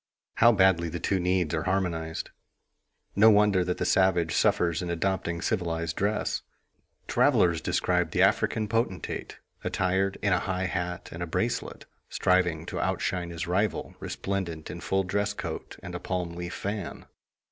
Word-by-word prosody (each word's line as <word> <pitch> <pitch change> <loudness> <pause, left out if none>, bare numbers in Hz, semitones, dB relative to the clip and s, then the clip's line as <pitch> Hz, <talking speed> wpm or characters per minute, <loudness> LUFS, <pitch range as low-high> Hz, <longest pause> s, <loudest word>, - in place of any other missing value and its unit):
How 120 +1 +7
badly 95 -5 +3
the 85 +2 -4
two 95 +4 0
needs 90 -2 +1
are 80 - -1
harmonized! 85 -4 -2 0.8
No 110 +3 +7
wonder 105 -3 +4
that 90 0 -2
the - - -1
savage 90 -4 +3
suffers 85 -1 +2
in 90 - -4
adopting 85 -1 -1
civilized 85 -2 -1
dress. 105 +2 0 0.7
Travelers 85 -2 +3
describe 90 -2 +1
the - - +2
African 110 -1 +2
potentate, 115 -4 -2 0.3
attired 95 +1 0
in 100 -3 +3
a 90 - +3
high 95 0 -2
hat 90 -1 -3
and 80 - -7
a 85 - -2
bracelet, 80 - -2 0.2
striving 90 -3 +1
to - - -4
outshine 90 -2 -1
his 85 0 -4
rival 95 +5 -1
resplendent 90 -5 -4
in - - -7
full 95 0 +1
dress 100 +2 -1
coat - - -6
and 90 - -7
a 90 - -4
palm 90 -2 -3
leaf 90 +1 -5
fan. 100 -2 -5
90 Hz, 155 wpm, -28 LUFS, 85-95 Hz, 0.8 s, How